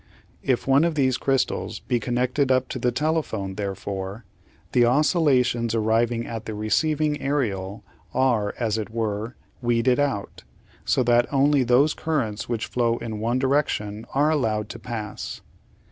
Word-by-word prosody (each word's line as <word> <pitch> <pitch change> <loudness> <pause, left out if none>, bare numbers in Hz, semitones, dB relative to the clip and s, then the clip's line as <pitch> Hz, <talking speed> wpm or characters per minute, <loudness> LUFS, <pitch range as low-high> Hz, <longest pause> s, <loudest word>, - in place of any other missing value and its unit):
If 130 -3 0
one 135 +3 +4
of 170 -2 +1
these 130 -3 +2
crystals 135 -4 0
be 125 -2 0
connected 125 +4 0
up 130 0 +2
to 130 - -4
the 125 +1 +1
telephone, 130 -9 -1
therefore, 100 +1 -5 0.5
the 120 - +4
oscillations 125 - +2
arriving 115 +1 +1
at 115 -2 -6
the 110 - -5
receiving 150 +8 0
aerial 105 -8 -2 0.3
are, 120 -6 +1
as 110 -2 0
it 110 - -4
were, 110 +1 -3 0.3
weeded 120 +2 +2
out, 135 -9 -2 0.4
so 130 - +2
that 120 0 +3
only 140 0 +3
those 125 +5 +4
currents 120 -11 -2
which 115 -2 -1
flow 120 -1 0
in 115 -2 -5
one 115 +3 0
direction 130 -6 0
are 150 +3 +3
allowed 110 -8 0
to 115 - -7
pass. 110 -2 -6
120 Hz, 145 wpm, -24 LUFS, 110-135 Hz, 0.5 s, one